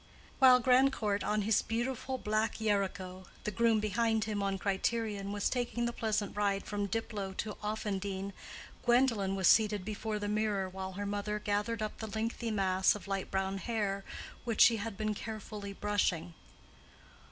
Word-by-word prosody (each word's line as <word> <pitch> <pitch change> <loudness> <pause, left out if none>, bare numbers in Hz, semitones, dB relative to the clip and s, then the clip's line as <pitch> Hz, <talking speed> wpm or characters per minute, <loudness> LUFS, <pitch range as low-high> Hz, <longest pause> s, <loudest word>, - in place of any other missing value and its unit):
While 255 -2 +8
Grandcourt 250 -5 +3
on 210 0 +1
his 220 +1 +3
beautiful 255 +3 -2
black 215 -1 0
Yarico, 190 -3 -1 0.2
the 210 - -2
groom 225 +1 +3
behind 220 +1 +1
him 210 -2 -2
on 195 -1 0
Criterion, 200 +1 -1
was 205 -1 0
taking 240 -1 -1
the 235 - -1
pleasant 215 -3 -1
ride 200 -1 +1
from 205 -1 -2
Diplow 200 -2 -3
to 210 -1 -3
Offendene, 200 -2 -3 0.5
Gwendolen 240 -6 +3
was 190 -2 +2
seated 210 -3 +4
before 215 +1 -3
the 205 0 -3
mirror 210 -2 0
while 190 0 -6
her 205 +2 -4
mother 205 +1 -2
gathered 210 +2 -1
up 215 - -5
the 220 - -4
lengthy 225 +2 -2
mass 190 -3 +3
of 210 - -9
light 195 -1 -2
brown 190 0 -1
hair 200 -2 -1 0.4
which 230 -3 0
she 230 -2 +8
had 220 -1 -5
been 215 -1 0
carefully 210 -1 -6
brushing. 185 -5 0
210 Hz, 160 wpm, -32 LUFS, 195-225 Hz, 0.5 s, While